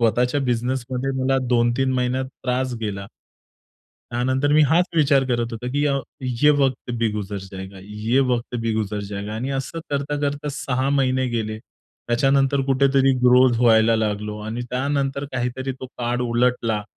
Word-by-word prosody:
स्वतःच्या 125 +4 +2
बिझनेसमध्ये 125 +1 -1
मला 135 0 +2
दोन-तीन 120 +2 +2
महिन्यात 125 +1 0 0.2
त्रास 125 0 -1
गेला. 100 -3 -4 1.0
त्यानंतर 130 +4 +1
मी 155 - +5
हाच 170 +3 +4
विचार 140 -3 +4
करत 120 -1 -1
होतो 120 +2 -5
की 145 +1 +1
अ, 140 -1 +1 0.5
"ये 150 - +7
वक्त 130 -3 0
भी 115 -1 +2
गुजर 105 -1 -4
जाएगा 95 0 -9 0.3
ये 135 - +5
वक्त 120 0 -2
भी 115 0 -1
गुजर 105 -1 -2
जाएगा." 100 +1 -5
आणि 125 +5 -3
असं 135 +5 -4
करता-करता 145 +1 -2
6 130 0 -1
महिने 130 -2 +1
गेले. 110 -2 -3
त्याच्यानंतर 135 +5 0
कुठेतरी 135 0 +3
ग्रोथ 125 -1 +5
व्हायला 115 -1 +5
लागलो 105 -1 -2
आणि 110 +3 -4
त्यानंतर 140 +1 -1
काहीतरी 130 +1 -2
तो 130 - -5
काळ 120 0 -1
उलटला 120 -2 +1
125 Hz, 150 wpm, -22 LUFS, 115-135 Hz, 1.0 s, ये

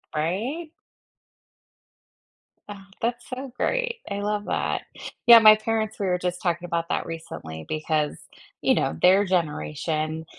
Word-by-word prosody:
Right? 235 - -2 2.0
Ah, 200 -1 -10
that's 235 +1 -2
so 260 0 -6
great. - - -1
I 200 - -3
love 205 0 -2
that. - - -1 0.4
Yeah, 235 -1 +10
my 215 -1 +9
parents 220 0 -2
we 200 - -1
were 180 0 +1
just 180 0 -3
talking 175 -1 -1
about 170 -1 -2
that - - -1
recently 80 - -8
because, 155 -1 -1 0.4
you - - +3
know, 80 - -1
their 195 +3 +5
generation, 155 - -2
185 Hz, 135 wpm, -25 LUFS, 160-220 Hz, 2.0 s, Yeah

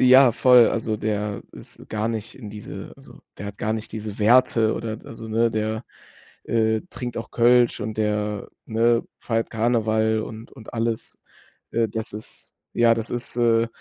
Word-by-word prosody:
Ja, 130 0 +8
voll, 125 0 +6
also 110 -1 -1
der 105 -1 -2
ist - - -12
gar 110 0 -1
nicht 115 -1 -5
in 110 -5 -9
diese 105 0 -8
also, - - -15 0.2
der 100 - -6
hat 100 0 -8
gar 110 - -1
nicht 110 0 -4
diese 110 -1 -6
Werte 115 0 +4
oder 115 -1 -4
d - - -14
also 115 0 -8
ne, 115 +1 +2
der, 110 +1 -2 0.6
äh, 110 -1 +1
trinkt 120 0 -6
auch 115 - -7
Kölsch 120 0 +4
und 110 +1 -4
der, 105 -1 -1 0.2
ne, 115 +1 +2 0.2
feiert 115 -1 -1
Karneval 110 -1 +1
und 110 +1 -8
und 110 -5 -12
alles. 115 -1 -2 0.5
Äh, 115 -1 +1
das 110 +1 -5
ist 105 +1 -10 0.2
ja, 115 -1 +5
das 115 0 -4
ist, 120 - -4
äh, 115 -1 +3
110 Hz, 175 wpm, -23 LUFS, 110-115 Hz, 0.6 s, Ja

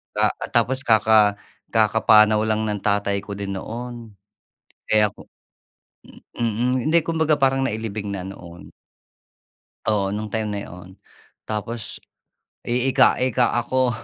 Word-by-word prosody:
Ka - - +3 0.2
tapos 130 +1 +1
kaka 110 -2 +4 0.4
kakapanaw 110 -1 +4
lang 110 0 0
ng 105 - -2
tatay 100 -1 +1
ko 100 +1 -6
din 100 -1 -5
noon. 120 +1 -7 0.8
Eh, 105 -1 +4
ako 100 - -11 1.1
mm. 120 +3 0
Hindi 160 +2 +4
kumbaga 160 -1 +1
parang 135 -2 +1
nailibing 105 -3 -4
na 95 - -5
noon. 90 -2 -11 1.2
Oo, 100 -2 0
nung 105 -1 -5
time 110 -1 -2
na 105 -1 -3
'yon. 90 +1 -12 0.5
Tapos 110 +1 -5 0.6
iika-ika 125 0 +2
ako, 130 +1 +1
110 Hz, 115 wpm, -22 LUFS, 105-125 Hz, 1.2 s, kaka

